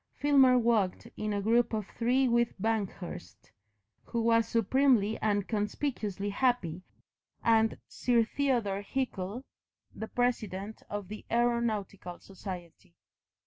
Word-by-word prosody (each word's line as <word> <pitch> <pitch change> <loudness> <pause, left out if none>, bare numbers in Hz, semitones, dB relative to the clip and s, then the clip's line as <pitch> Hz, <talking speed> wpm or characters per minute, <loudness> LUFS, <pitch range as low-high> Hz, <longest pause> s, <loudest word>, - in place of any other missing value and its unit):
Filmer 270 -3 +5
walked 225 -6 +1
in 215 0 -3
a 200 -1 -1
group 235 +2 +3
of 215 -2 -1
three 250 +3 +2
with 235 -3 +1
Banghurst, 195 - -4 0.5
who 235 - -3
was 230 -1 +3
supremely 230 -1 +2
and 205 -2 0
conspicuously 210 -2 -2
happy, 200 -8 0 0.6
and 225 -1 +3
Sir 240 -2 +2
Theodore 235 -6 0
Hickle, 220 -1 -3 0.5
the 220 - -6
president 220 -5 -2
of 205 -2 -4
the 215 +2 -8
Aeronautical 225 -6 -1
Society. 180 -2 -9
220 Hz, 110 wpm, -30 LUFS, 200-240 Hz, 0.6 s, Filmer